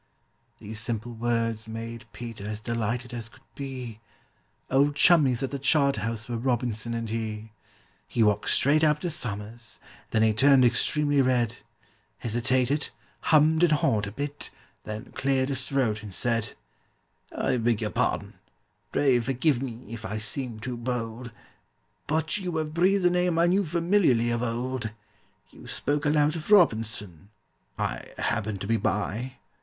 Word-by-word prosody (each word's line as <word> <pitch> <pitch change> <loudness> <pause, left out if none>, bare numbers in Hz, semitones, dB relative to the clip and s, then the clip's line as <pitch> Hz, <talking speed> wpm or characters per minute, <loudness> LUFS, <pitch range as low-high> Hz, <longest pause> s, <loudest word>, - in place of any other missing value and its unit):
These 105 +1 -7
simple 115 +1 -3
words 115 -1 -1
made 115 +1 -7
PETER 115 -4 -7
as 105 0 -4
delighted 115 +2 -2
as 115 -1 -5
could - - -20
be, 130 -5 -6 0.7
Old 140 +2 +3
chummies 140 -7 +5
at 135 - -2
the 140 - -3
Charterhouse 135 -6 +1
were 120 -1 -2
ROBINSON 120 -2 -1
and 115 0 -3
he! 110 -1 -4 0.6
He 115 - +1
walked 105 -1 +2
straight 150 +3 +3
up 150 -1 +4
to 175 - -2
SOMERS, 115 -3 -4 0.3
then 110 - +2
he 110 -1 +4
turned 130 +3 +6
extremely 145 +3 +3
red, 120 -3 +1 0.6
Hesitated, 130 +5 0 0.4
hummed 155 +1 +5
and 175 -3 +5
hawed 105 -8 +2
a - - -6
bit, 145 +5 -4 0.4
then 110 +3 -6
cleared 135 0 0
his 135 -2 -2
throat, 120 -6 +1
and 105 -2 -8
said: 115 +2 -1 0.8
"I 125 - 0
beg 115 -2 +1
your 105 - -1
pardon—pray 135 -4 -1
forgive 130 +2 +1
me 120 -3 -6
if 115 -2 -7
I 110 0 -3
seem 110 +1 -5
too 120 +2 -4
bold, 120 0 -4 0.8
But 155 +4 0
you 180 -5 -3
have 155 -1 -2
breathed 185 +3 +3
a 175 - +5
name 180 -1 +1
I 170 - +5
knew 190 +3 +3
familiarly 170 - +2
of 120 0 -1
old. 125 0 -2 0.6
You - - -14
spoke 145 +1 -1
aloud 150 +1 +3
of 165 +2 -6
ROBINSON—I 105 - 0
happened 105 -2 -1
to - - -3
be 115 +1 +2
by. 110 +5 -1
120 Hz, 150 wpm, -27 LUFS, 110-145 Hz, 0.8 s, turned